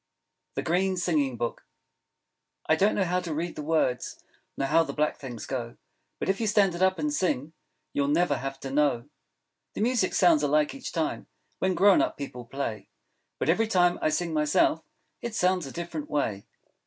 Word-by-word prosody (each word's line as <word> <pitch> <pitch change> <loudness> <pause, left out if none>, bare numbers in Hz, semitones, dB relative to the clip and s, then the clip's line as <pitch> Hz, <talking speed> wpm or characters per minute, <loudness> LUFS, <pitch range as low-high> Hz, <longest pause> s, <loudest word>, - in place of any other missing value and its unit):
The - - -2
Green 185 +3 +1
Singing 150 -8 0
Book 120 0 -3 1.0
I 155 - +4
don't 200 +6 +3
know 200 - +2
how 180 0 0
to 170 -4 -4
read 170 +2 -3
the - - -5
words, 150 -5 0 0.4
Nor 135 - -1
how 165 +3 +5
the 165 - -3
black 150 0 0
things 120 -6 -7
go. 120 -3 -4 0.4
But - - -3
if 195 +3 0
you 220 - +1
stand 205 -3 +3
it 175 - -5
up, 190 0 +3
and 300 -1 -1
sing, 160 - -1 0.4
You 140 -1 +1
never 150 -1 +2
have 135 0 -5
to 135 - -5
know. 140 -3 +1 0.7
The - - -3
music 230 -4 +1
sounds 170 -5 +5
alike 150 +1 +2
each 275 -2 -7
time 160 -3 -2 0.3
When 185 -1 +1
grown 200 -1 +6
up - - -1
people 125 -4 -7
play; 115 -5 -5 0.5
But - - -2
every 215 +7 +3
time 175 -4 +3
I - - +2
sing, 160 +2 -1
myself, 155 +1 +2 0.4
It 235 -2 -4
sounds 180 -5 +1
a - - -8
different 170 -2 -5
way. 110 -9 -1
160 Hz, 190 wpm, -27 LUFS, 140-185 Hz, 1.0 s, grown